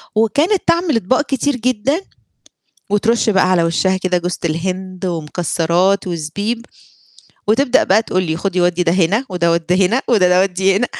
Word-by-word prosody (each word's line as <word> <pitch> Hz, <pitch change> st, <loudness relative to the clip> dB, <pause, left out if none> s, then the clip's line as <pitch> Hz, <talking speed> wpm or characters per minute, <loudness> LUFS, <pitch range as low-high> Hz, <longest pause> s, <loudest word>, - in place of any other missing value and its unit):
وكانت 295 Hz, -, +2 dB
تعمل 335 Hz, -3 st, +2 dB
أطباق 225 Hz, +7 st, +1 dB
كتير 285 Hz, 0 st, -1 dB
جدًا، 255 Hz, -, -1 dB, 0.9 s
وترُش 225 Hz, +2 st, +1 dB
بقى 190 Hz, -2 st, +2 dB
على 180 Hz, -2 st, +3 dB
وشّها 185 Hz, +3 st, +1 dB
كده 185 Hz, -1 st, 0 dB
جوزة 180 Hz, +1 st, -4 dB
الهند 185 Hz, +3 st, -3 dB
ومكسّرات 175 Hz, +3 st, 0 dB
وزبيب، 200 Hz, +8 st, -4 dB, 0.8 s
وتبدأ 245 Hz, +4 st, +3 dB
بقى 210 Hz, +4 st, +3 dB
تقول 185 Hz, -4 st, -1 dB
لي 160 Hz, -3 st, -2 dB
خُدي 185 Hz, +1 st, -2 dB
ودِّي 175 Hz, 0 st, +1 dB
ده 165 Hz, -1 st, +1 dB
هنا 190 Hz, +7 st, +1 dB
وده 170 Hz, -2 st, 0 dB
ودِّي 180 Hz, +3 st, +1 dB
هنا 240 Hz, +8 st, 0 dB
وده 210 Hz, -7 st, +4 dB
ال 180 Hz, +1 st, +4 dB
ودي 190 Hz, +1 st, +1 dB
هنا 245 Hz, -, +1 dB
190 Hz, 160 wpm, -17 LUFS, 175-225 Hz, 0.9 s, وده